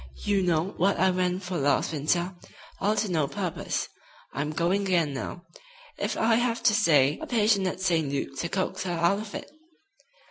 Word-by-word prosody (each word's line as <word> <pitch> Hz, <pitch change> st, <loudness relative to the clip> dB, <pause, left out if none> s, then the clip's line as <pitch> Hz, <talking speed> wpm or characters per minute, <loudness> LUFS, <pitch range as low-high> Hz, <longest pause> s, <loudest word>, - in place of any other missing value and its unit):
You 200 Hz, -1 st, +2 dB
know 175 Hz, -1 st, +1 dB
what 195 Hz, +3 st, +2 dB
I 190 Hz, +2 st, +3 dB
went 180 Hz, +1 st, -1 dB
for 180 Hz, 0 st, -3 dB
last 140 Hz, +3 st, +1 dB
winter, 170 Hz, +5 st, 0 dB, 0.5 s
all 210 Hz, +2 st, +1 dB
to 210 Hz, -3 st, -1 dB
no 155 Hz, -5 st, +1 dB
purpose. 140 Hz, -, -3 dB, 0.5 s
I'm 145 Hz, +2 st, -2 dB
going 170 Hz, +5 st, +1 dB
again 175 Hz, -7 st, +1 dB
now, 175 Hz, +6 st, -6 dB, 0.6 s
if -, -, -2 dB
I 225 Hz, 0 st, +3 dB
have 235 Hz, -1 st, 0 dB
to 230 Hz, -, +5 dB
stay 150 Hz, -9 st, +4 dB
a -, -, -5 dB
patient 210 Hz, -5 st, +2 dB
at 185 Hz, -, -4 dB
St. 165 Hz, -6 st, +1 dB
Luke's 135 Hz, -1 st, -3 dB
to 170 Hz, -, -3 dB
coax 185 Hz, +1 st, -2 dB
her 180 Hz, -2 st, -2 dB
out 170 Hz, +4 st, +2 dB
of 215 Hz, -1 st, -7 dB
it." -, -, -7 dB
180 Hz, 185 wpm, -27 LUFS, 160-200 Hz, 0.6 s, to